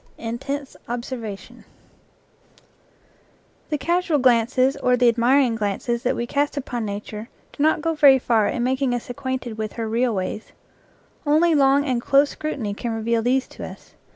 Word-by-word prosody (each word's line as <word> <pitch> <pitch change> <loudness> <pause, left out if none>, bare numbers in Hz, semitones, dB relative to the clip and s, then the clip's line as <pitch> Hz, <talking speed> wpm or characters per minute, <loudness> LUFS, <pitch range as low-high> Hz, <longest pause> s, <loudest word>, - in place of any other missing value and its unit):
INTENSIVE 270 +5 -5
OBSERVATION 235 -4 -6 2.1
fllHE 300 - 0
casual 340 +2 +1
glances 255 +1 +3
or 250 0 +2
the 245 0 +4
admiring 240 +2 +3
glances 225 +2 -2
that 250 - 0
JL - - -7
we 235 - -1
cast 285 +3 -1
upon 245 -4 -3
nature 210 +2 -6 0.2
do - - -6
not 315 +1 +2
go 330 - +1
very 285 -3 +6
far 230 -4 +2
in 240 - -1
mak 260 +2 0
ing 255 -3 +1
us 245 +2 -5
acquainted 255 -3 -4
with 215 -1 -3
her 230 -1 -4
real 235 +1 0
ways. 190 +3 -4 0.7
Only 320 +3 +3
long 280 -1 +4
and 250 -4 0
close 280 +3 +3
scrutiny 265 -9 -4
can 230 +3 -4
reveal 225 +1 0
these 255 +3 +1
to - - -10
us. - - -10
250 Hz, 165 wpm, -22 LUFS, 230-280 Hz, 2.1 s, very